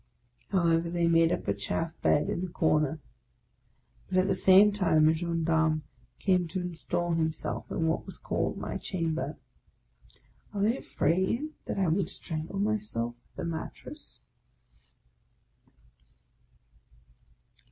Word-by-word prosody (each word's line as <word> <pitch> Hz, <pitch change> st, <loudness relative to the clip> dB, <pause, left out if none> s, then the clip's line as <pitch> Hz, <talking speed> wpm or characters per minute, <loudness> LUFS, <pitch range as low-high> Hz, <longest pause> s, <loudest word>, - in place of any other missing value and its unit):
" 120 Hz, -, -44 dB
However 170 Hz, -3 st, +2 dB
they 170 Hz, 0 st, +1 dB
made 165 Hz, 0 st, +4 dB
up -, -, -2 dB
a 100 Hz, -, +2 dB
chaff 160 Hz, +11 st, -3 dB
bed 145 Hz, -, +3 dB
in -, -, -2 dB
the 185 Hz, -, -2 dB
corner. 155 Hz, -3 st, +1 dB, 1.1 s
But 185 Hz, -, 0 dB
at 185 Hz, +1 st, +4 dB
the 195 Hz, -, +2 dB
same 190 Hz, +2 st, +7 dB
time 165 Hz, -6 st, +3 dB
a 160 Hz, -, +5 dB
gendarme 160 Hz, -2 st, +1 dB, 0.3 s
came 180 Hz, -3 st, +2 dB
to 175 Hz, +3 st, -3 dB
install 175 Hz, 0 st, -2 dB
himself 160 Hz, -1 st, -2 dB
in 165 Hz, -, -1 dB
what 160 Hz, 0 st, -1 dB
was -, -, -9 dB
called -, -, -2 dB
my -, -, -4 dB
chamber. 165 Hz, -3 st, -3 dB, 1.2 s
Are 200 Hz, -, -1 dB
they 225 Hz, +4 st, +3 dB
afraid 190 Hz, -, 0 dB
that -, -, -3 dB
I 190 Hz, -2 st, +2 dB
would 170 Hz, +2 st, +1 dB
strangle 165 Hz, 0 st, -4 dB
myself 200 Hz, -, 0 dB
with 120 Hz, 0 st, -37 dB
the -, -, -4 dB
mattress? 165 Hz, -1 st, -7 dB
170 Hz, 130 wpm, -29 LUFS, 160-185 Hz, 1.2 s, same